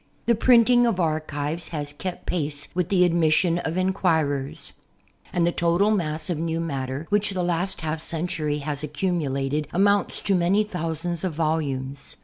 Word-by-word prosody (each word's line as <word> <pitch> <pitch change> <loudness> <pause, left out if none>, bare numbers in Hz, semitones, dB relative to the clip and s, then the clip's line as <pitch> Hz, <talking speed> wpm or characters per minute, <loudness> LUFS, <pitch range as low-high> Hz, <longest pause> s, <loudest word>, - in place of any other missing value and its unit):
The 235 - +4
printing 240 +1 +5
of 215 -5 0
archives 155 -1 -1
has 145 -3 -4
kept 180 +4 -6
pace 145 -4 -1
with 180 -2 -1
the 180 -2 +4
admission 170 0 +3
of 165 0 -3
enquirers; 160 -7 0 0.6
and 175 -1 +1
the 175 - +2
total 170 +5 +2
mass 160 -6 -1
of 175 -4 -2
new 165 0 -1
matter, 140 -2 -3
which 205 0 +2
the 185 -2 -2
last 175 +2 -1
half 155 0 -3
century 160 -3 -1
has 145 -1 -4
accumulated, 150 -3 -1
amounts 200 +2 +2
to 200 - +1
many 185 +3 +3
thou 165 -6 -3
.sands 170 +1 -4
of 180 -5 -2
volumes. 140 -4 -2
165 Hz, 160 wpm, -24 LUFS, 150-185 Hz, 0.6 s, printing